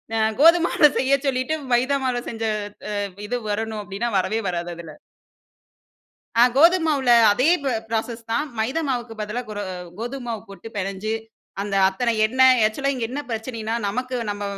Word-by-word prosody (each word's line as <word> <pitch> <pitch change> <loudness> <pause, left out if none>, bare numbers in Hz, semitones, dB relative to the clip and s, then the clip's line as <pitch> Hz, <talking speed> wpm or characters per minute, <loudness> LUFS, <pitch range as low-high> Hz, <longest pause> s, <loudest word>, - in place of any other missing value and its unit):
அ 225 - +1 0.2
கோதுமாவ்ல 330 -2 +6
செய்ய 275 +1 +3
சொல்லிட்டு, 265 +4 0 0.2
மைதா 260 +4 +2
மாவுல 250 -2 0
செஞ்ச 225 -1 -6 0.6
அ - - -1 0.3
இது 245 +2 -1
வரணும் 215 0 -2
அப்டினா, 205 +5 -3
வரவே 215 +4 0
வராது 175 -1 -3
அதில. 165 -3 -10 1.4
ஆ, - - +8
கோதும் 335 +2 +5
மாவுல 275 -5 +1 0.2
அதே 255 +9 +2 0.2
ப - - -3 0.2
ப்ராசஸ் 230 +1 -3
தான். 295 +7 0
மைதா 260 +9 0
மாவுக்கு 240 -3 -3
பதிலா 210 +3 -3
குர 210 -1 -6 0.4
கோதும 245 +2 -5
மாவு 225 -2 -3
போட்டு 200 +3 -10
பெனஞ்சு 195 +2 -3 0.5
அந்த 205 -1 -4
அத்தனை 235 +5 0
எண்ணெய் 255 0 +5
ஆக்சுவலா 275 +6 -1
இங்க 245 - -3
என்ன 285 +3 -3
பிரச்சனைன்னா 225 0 -4
நமக்கு 255 +5 -3
நம்ப 205 0 -4
235 Hz, 155 wpm, -23 LUFS, 215-260 Hz, 1.4 s, ஆ